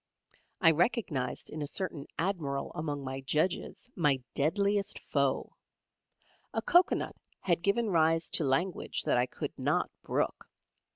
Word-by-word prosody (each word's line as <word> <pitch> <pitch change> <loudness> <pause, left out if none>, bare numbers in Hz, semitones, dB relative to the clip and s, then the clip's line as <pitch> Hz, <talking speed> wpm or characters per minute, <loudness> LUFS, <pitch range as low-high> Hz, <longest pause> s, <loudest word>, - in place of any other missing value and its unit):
I 165 -3 +7
recognised 165 - 0
in 155 - -5
a 145 - -2
certain 155 -3 -1
Admiral 160 -7 -2
among 145 -2 -3
my 135 0 -4
judges 155 - -1
my 145 -7 +2
deadliest 200 +7 +1
foe. 140 -2 -1 1.0
A - - +1
cocoa 350 +1 +5
nut - - -4 0.3
had 170 -2 +1
given 205 +4 +1
rise 165 -1 +3
to - - +2
language 165 +7 0
that 145 -5 +2
I 125 - +2
could - - -5
not - - +1
brook. - - -2
160 Hz, 135 wpm, -31 LUFS, 140-190 Hz, 1.0 s, I